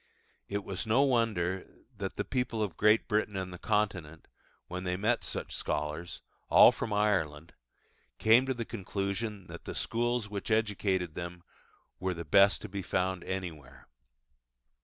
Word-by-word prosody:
It 100 0 -3
was 95 +4 -5
no 120 +6 +4
wonder 110 -9 +1 0.3
that 100 -2 -4
the - - -2
people 125 -4 -1
of 100 -5 -3
Great 105 +1 +4
Britain 105 -2 0
and 95 -1 -4
the 90 - -9
Continent, 95 -7 -1 0.4
when 90 +1 -5
they 90 -1 -1
met 115 +4 +1
such - - -4
scholars, 75 +3 -3 0.3
all - - +9
from 110 - -4
Ireland, 85 -7 0 0.6
came 115 +4 +5
to 130 - 0
the 115 -1 -4
conclusion 100 0 -3
that - - -10
the - - -5
schools 120 -1 0
which 100 -1 -5
educated 100 -6 +1
them 85 0 -6 0.6
were 95 0 -1
the 85 0 -6
best 100 +7 +5
to - - -5
be 100 -1 -5
found 95 0 -1
anywhere. 80 -9 -6
100 Hz, 155 wpm, -31 LUFS, 90-110 Hz, 0.6 s, all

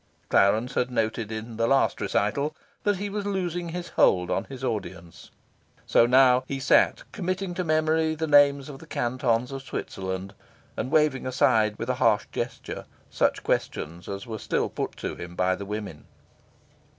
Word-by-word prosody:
Clarence 110 +6 +3
had 125 - 0
noted 110 -2 -1
in 110 +1 -6
the 115 0 +1
last 135 +2 +2
recital 140 +9 0 0.3
that 205 -2 +1
he 200 +2 -3
was 205 0 -3
losing 175 -4 -2
his 175 +1 -5
hold 90 -1 +3
on - - 0
his 135 -1 -9
audience. 90 -8 -5 0.6
So 115 - +4
now 125 0 +5
he 135 - -3
sat 135 - +3
committing 185 -1 -3
to 180 - -2
memory 155 0 +1
the 160 +1 -2
names 145 -2 +5
of 140 -3 -9
the - - -13
cantons 120 0 0
of 135 0 -5
Switzerland, 95 -6 -5 0.4
and 125 - -3
waving 145 -4 +2
aside 110 -4 +3
with - - -4
a - - +1
harsh - - +3
gesture - - -5 0.3
such - - +1
questions 85 +3 -2
as 100 +3 -5
were 110 -2 -6
still - - -1
put - - -4
to - - -4
him 85 0 -8
by 90 +1 +2
the 100 - -7
women. 105 -7 -6
125 Hz, 170 wpm, -26 LUFS, 105-155 Hz, 0.6 s, now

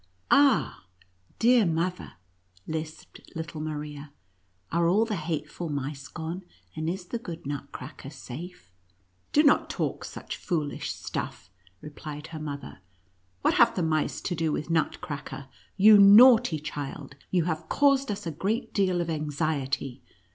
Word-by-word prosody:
" 90 - -15
Ah, 275 - +4 0.5
dear 240 0 +5
mother," 175 +1 -1 0.5
lisped 155 0 -6
little 160 -1 -5
Maria, 150 -1 -6 0.3
" 90 0 -41
are 170 0 +2
all 205 +6 +4
the 220 -2 -2
hateful 165 0 -4
mice 140 -1 -4
gone, 165 +3 -5 0.3
and 155 +1 -2
is 180 +1 -4
the 235 +6 -4
good 170 -8 -8
Nutcracker 140 -1 -7
safe 140 - -9
V 90 +1 -40
" 90 0 -41
Do 300 - +5
not 285 - +4
talk - - -2
such - - -7
foolish 155 -5 -2
stuff," 90 - -6 0.3
replied 150 0 -8
her 155 - -5
mother; 140 -8 -7 0.3
" 90 -1 -41
what - - +4
have 235 - +5
the 180 - 0
mice 155 -1 0
to 180 - -2
do 165 -2 0
with 150 +2 -3
Nut 160 -2 +1
cracker? 140 -2 -7 0.3
You 210 +1 +8
naughty 220 -1 +8
child, 145 -2 -6 0.2
you 180 -3 +2
have 160 -1 -3
caused 275 -1 +3
us 205 -1 -4
a 165 - -2
great 200 - -2
deal 185 -3 +2
of 170 - -3
anxiety. 145 -4 -2
155 Hz, 155 wpm, -27 LUFS, 145-185 Hz, 0.5 s, You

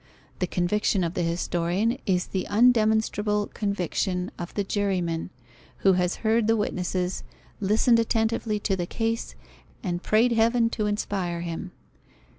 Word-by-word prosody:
The 180 - 0
conviction 185 +2 +1
of 170 0 -2
the 180 - -1
historian 175 +7 0
is 180 -2 +2
the 190 -2 -3
undemonstrable 215 -2 +2
conviction 185 -2 -1
of 175 - -5
the 205 - 0
juryman, 185 -5 -1 0.6
who 195 - +7
has 180 0 +1
heard 220 0 +3
the 225 0 +3
witnesses, 185 -2 -2 0.4
listened 220 +4 +3
attentively 225 -1 0
to 195 - 0
the 175 -2 -3
case, 225 +2 -2 0.5
and 175 -3 -2
prayed 225 +5 +3
Heaven 230 0 +3
to 215 -3 -1
inspire 190 -4 -2
him. 170 +2 -5
205 Hz, 135 wpm, -26 LUFS, 180-220 Hz, 0.6 s, who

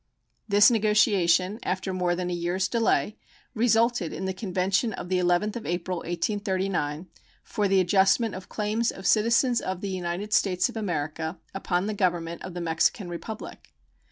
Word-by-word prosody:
This 205 +3 +6
negotiation, 210 -3 +3
after 185 +1 -2
more 180 -1 0
than 180 0 -3
a - - -1
year's 175 +2 -1
delay, 225 0 +1 0.4
resulted 230 -4 +2
in 190 - -5
the 190 - -2
convention 190 +3 0
of 180 - -7
the 185 -1 +1
11th 180 +5 +1
of 230 - -8
April, 175 +1 -2
1839, 185 -3 -2 0.4
"for 210 -3 -1
the 195 0 +3
adjustment 195 +4 +3
of 185 - -9
claims 215 +2 -1
of 190 - -7
citizens 235 +2 +3
of 185 -1 -4
the 200 - -3
United 185 +3 -3
States 180 +2 +2
of 245 - -10
America 160 -4 -3 0.2
upon 185 -1 -1
the 215 - -2
Government 175 -4 -1
of 185 -2 -8
the 175 - -4
Mexican 170 +3 0
Republic." 210 +6 -8
190 Hz, 160 wpm, -26 LUFS, 175-210 Hz, 0.4 s, This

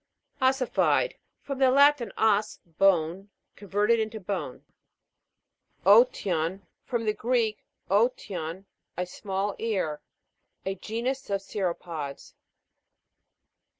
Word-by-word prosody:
OS'SIFIED. 260 - +2 0.3
From 275 -2 -5
the 265 -1 +5
Latin, 280 -4 +4
os, 215 -1 +2
bone. 180 +2 +1 0.3
Converted 210 +3 +1
into 220 0 -3
bone. 180 -9 -5 1.2
O'TIOPJ. 195 -5 +4 0.2
From 235 -3 -2
the 215 - +2
Greek, 225 -1 0 0.2
dtion, 195 -5 0 0.3
a 180 - -1
small 195 +2 -3
ear. 190 -10 -1 0.6
A 195 - -1
genus 230 +7 -4
of 200 -1 0
cirrhopods. 170 -7 -4
205 Hz, 90 wpm, -27 LUFS, 185-230 Hz, 1.2 s, the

